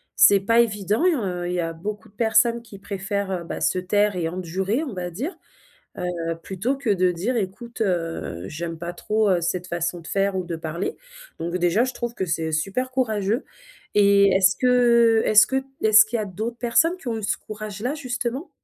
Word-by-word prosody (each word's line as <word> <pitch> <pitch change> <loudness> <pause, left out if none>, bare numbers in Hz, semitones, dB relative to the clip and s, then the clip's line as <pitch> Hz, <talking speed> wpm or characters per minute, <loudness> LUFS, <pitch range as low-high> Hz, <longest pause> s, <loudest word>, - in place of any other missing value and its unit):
c'est 200 - +7
pas 230 +4 +2
évident, 210 - 0
heu. 190 - 0
Il 180 - -2
y 180 - -1
a 165 -1 -2
beaucoup 200 +4 -6
de - - -29
personnes 230 +2 +2
qui 210 -4 -13
préfèrent, 195 -2 -3
bah, - - -5
se 185 - +1
taire 205 +2 +1
et 170 -2 -1
endurer, 185 - -2
on 265 -9 -5
va 180 -1 -4
dire, 275 - -5 0.6
heu, 170 -2 -3
plutôt 200 +8 -2
que 270 -4 -3
de 185 -3 +3
dire: 200 +9 -2
«Écoute, 230 +4 -5
heu, 165 - -2
j'aime 165 +4 -5
pas 170 +2 -5
trop, 215 +3 0
heu, 180 -2 +2
cette 175 +1 -2
façon 175 0 -2
de 165 - -12
faire 195 0 0
ou 185 - -1
de 170 -1 -4
parler.» 165 - -4 0.4
donc 170 +2 -2
déjà, 175 +6 +2
je 255 - -2
trouve 240 -1 -4
que 190 - -2
c'est 160 -1 -2
super 195 +12 -1
courageux, 220 -2 0 0.5
et 200 -1 +5
est-ce 190 -1 +4
que 235 -3 +4
est-ce 215 +1 +7
que 265 +1 0 0.2
est-ce 220 +1 +7
qu'il 230 +2 -2
y - - -2
a - - -3
d'autres 220 +5 -5
personnes 325 +10 +2
qui 275 - -11
ont 225 - -2
eu 220 - -6
ce - - 0
courage-là, 215 +4 -5
justement? 255 +1 -4
200 Hz, 205 wpm, -23 LUFS, 180-235 Hz, 0.6 s, c'est